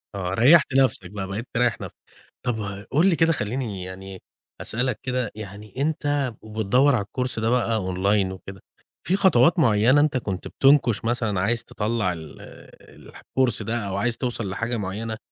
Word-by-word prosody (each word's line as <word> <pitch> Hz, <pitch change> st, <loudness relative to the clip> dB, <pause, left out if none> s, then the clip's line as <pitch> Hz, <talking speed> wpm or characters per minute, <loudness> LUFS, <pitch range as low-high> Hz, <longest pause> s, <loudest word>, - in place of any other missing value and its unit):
آه، 90 Hz, -1 st, -3 dB
ريّحت 140 Hz, -, +5 dB
نفسك 130 Hz, -9 st, +2 dB
بقى، 100 Hz, -2 st, -5 dB
بقيت 110 Hz, +6 st, -5 dB
تريّح 120 Hz, -1 st, +1 dB
نفسك. -, -, -8 dB, 0.5 s
طب 105 Hz, -4 st, -4 dB
قُل 165 Hz, +7 st, +4 dB
لي 170 Hz, -, +3 dB
كده، 165 Hz, +1 st, +3 dB
خلّيني 105 Hz, -5 st, -3 dB
يعني 95 Hz, +1 st, -9 dB, 0.4 s
أسألك 125 Hz, 0 st, -2 dB
كده، 125 Hz, -3 st, -2 dB
يعني 105 Hz, -1 st, -9 dB
أنت 145 Hz, -4 st, 0 dB
وبتدوّر 110 Hz, +6 st, +2 dB
على 100 Hz, -, 0 dB
الكورس 125 Hz, +1 st, -3 dB
ده 110 Hz, +1 st, 0 dB
بقى 120 Hz, -2 st, +1 dB
أونلاين 95 Hz, 0 st, 0 dB
وكده، 95 Hz, 0 st, -10 dB, 0.4 s
في 185 Hz, -, +1 dB
خطوات 170 Hz, -2 st, +4 dB
معيّنة 125 Hz, +2 st, +4 dB
أنت 150 Hz, -3 st, +1 dB
كنت 95 Hz, -6 st, -4 dB
بتُنكش 135 Hz, -6 st, +3 dB
مثلًا 115 Hz, -5 st, 0 dB
عايز 115 Hz, +5 st, 0 dB
تطلّع 105 Hz, -3 st, -1 dB
ال 80 Hz, -3 st, -10 dB, 0.4 s
الح -, -, -15 dB
الكورس 125 Hz, -5 st, 0 dB
ده 110 Hz, +3 st, -2 dB
أو 95 Hz, -, -3 dB
عايز 115 Hz, +3 st, 0 dB
توصَل 120 Hz, -6 st, -2 dB
لحاجة 115 Hz, +4 st, -2 dB
مُعينة 110 Hz, +3 st, -4 dB
115 Hz, 165 wpm, -24 LUFS, 100-130 Hz, 0.5 s, ريّحت